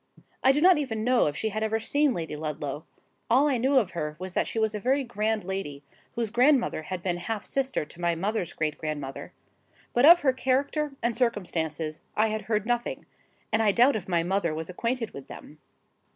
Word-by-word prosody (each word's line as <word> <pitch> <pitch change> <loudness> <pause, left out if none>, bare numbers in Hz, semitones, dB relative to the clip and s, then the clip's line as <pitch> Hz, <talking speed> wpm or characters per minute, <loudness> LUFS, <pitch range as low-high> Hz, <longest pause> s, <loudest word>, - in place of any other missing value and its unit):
I 265 - +7
do 290 +2 +1
not 360 -2 +6
even 225 -7 -3
know 250 -4 +3
if 145 - -3
she 220 - -1
had 215 +1 -4
ever 220 0 0
seen 285 +6 +2
Lady 160 -3 -4
Ludlow: 150 -1 -5 0.4
all 265 +6 +5
I 265 -4 +1
knew 265 +3 +3
of 210 -8 +2
her 150 -3 -4
was 185 +1 -7
that - - 0
she - - -5
was 220 -1 +1
a 210 - -3
very 265 +6 +1
grand 220 -2 -1
lady, 175 -7 -5 0.3
whose 230 -3 -2
grandmother 250 - +3
had 175 +2 -6
been 175 -2 -1
half 205 +4 -4
sister 270 - -1
to 170 +3 -14
my 170 -1 +1
mother's 190 0 -2
great 155 -1 -2
grandmother; 145 -4 -5 0.6
but 245 - +3
of 345 +1 +9
her 265 -3 +3
character 275 +3 0
and 235 -1 +1
circumstances 165 - -1 0.2
I 220 +1 +3
had 215 0 -2
heard 215 -2 -1
nothing, 240 0 -2 0.5
and 220 - +2
I 215 -2 +4
doubt 245 +7 +4
if 205 -4 -4
my 170 -2 +1
mother 175 -3 0
was 160 +3 -5
acquainted 230 +4 -2
with 140 - -10
them. 150 - -12
215 Hz, 210 wpm, -27 LUFS, 170-250 Hz, 0.6 s, of